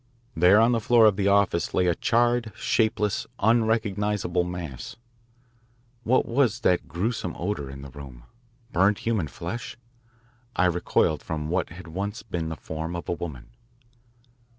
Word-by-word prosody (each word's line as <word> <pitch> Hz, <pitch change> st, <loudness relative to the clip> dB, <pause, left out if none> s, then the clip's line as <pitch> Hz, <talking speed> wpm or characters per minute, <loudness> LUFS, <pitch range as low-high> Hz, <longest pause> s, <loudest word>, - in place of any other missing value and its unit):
There 90 Hz, +5 st, +6 dB
on 115 Hz, +2 st, +5 dB
the 115 Hz, -, +2 dB
floor 115 Hz, +1 st, +5 dB
of 105 Hz, -2 st, +5 dB
the 100 Hz, 0 st, 0 dB
office 100 Hz, -3 st, +2 dB
lay 90 Hz, -, +3 dB
a 90 Hz, -, +3 dB
charred, 120 Hz, +3 st, +1 dB
shapeless, 105 Hz, -2 st, 0 dB
unrecognisable 105 Hz, -5 st, +1 dB
mass. 90 Hz, -7 st, -6 dB, 1.1 s
What 120 Hz, +2 st, +2 dB
was 120 Hz, -2 st, +1 dB
that 90 Hz, -5 st, +2 dB
gruesome 90 Hz, 0 st, -2 dB
odour 85 Hz, -7 st, -3 dB
in 70 Hz, 0 st, -9 dB
the 70 Hz, -, -10 dB
room? 65 Hz, -3 st, -11 dB, 0.5 s
Burned 100 Hz, +4 st, +3 dB
human 110 Hz, -9 st, -1 dB
flesh? 110 Hz, -, -6 dB, 0.8 s
I 90 Hz, -, +3 dB
recoiled 85 Hz, -3 st, +1 dB
from 75 Hz, -1 st, -4 dB
what 90 Hz, +1 st, 0 dB
had 85 Hz, +1 st, -11 dB
once 100 Hz, +6 st, -4 dB
been 85 Hz, -7 st, -3 dB
the 80 Hz, -, -4 dB
form 80 Hz, +3 st, -5 dB
of 85 Hz, -, -6 dB
a -, -, +1 dB
woman. 75 Hz, -8 st, -7 dB
95 Hz, 150 wpm, -25 LUFS, 85-110 Hz, 1.1 s, There